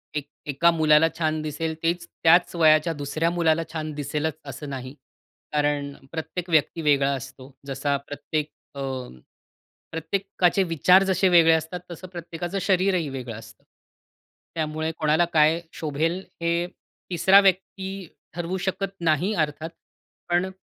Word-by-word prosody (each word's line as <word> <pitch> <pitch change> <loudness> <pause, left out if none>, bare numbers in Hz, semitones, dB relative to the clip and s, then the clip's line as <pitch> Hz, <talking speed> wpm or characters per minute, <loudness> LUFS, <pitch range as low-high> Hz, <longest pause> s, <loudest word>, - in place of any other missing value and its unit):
एक 145 -1 -3 0.2
एका 150 +4 +3
मुलाला 155 -1 +4
छान 155 -1 0
दिसेल 155 +1 -3
तेच 170 +1 0 0.2
त्याच 170 +2 +5
वयाच्या 155 0 +4
दुसऱ्या 155 +3 -1
मुलाला 165 -2 +2
छान 155 -1 -3
दिसेलच 150 +1 -2
असं 140 +1 -7
नाही. 130 -1 -6 0.6
कारण 145 -1 0 0.2
प्रत्येक 170 +2 -5
व्यक्ती 160 +1 +2
वेगळा 140 -2 +3
असतो. 135 0 -10 0.2
जसा 140 +1 -1
प्रत्येक 145 +2 -4 0.3
अ, - - -7 1.1
प्रत्येकाचे 185 +3 0
विचार 180 +3 +4
जसे 190 0 +2
वेगळे 165 -2 +6
असतात, 160 +2 -1
तसं 180 +2 -8
प्रत्येकाचं 175 +1 -5
शरीरही 185 -3 +2
वेगळं 125 -4 -6
असतं. 115 +1 -13 0.9
त्यामुळे 155 0 -2
कोणाला 155 +2 +3
काय 155 +1 +4
शोभेल 160 +3 -1 0.2
हे 170 +1 0 0.4
3सरा 190 +2 +6
व्यक्ती 190 0 -1 0.3
ठरवू 175 +2 -3
शकत 195 +1 -2
नाही 170 +4 +1
अर्थात. 155 -2 -1 0.6
पण 175 +2 +1
160 Hz, 130 wpm, -24 LUFS, 150-175 Hz, 1.1 s, वेगळे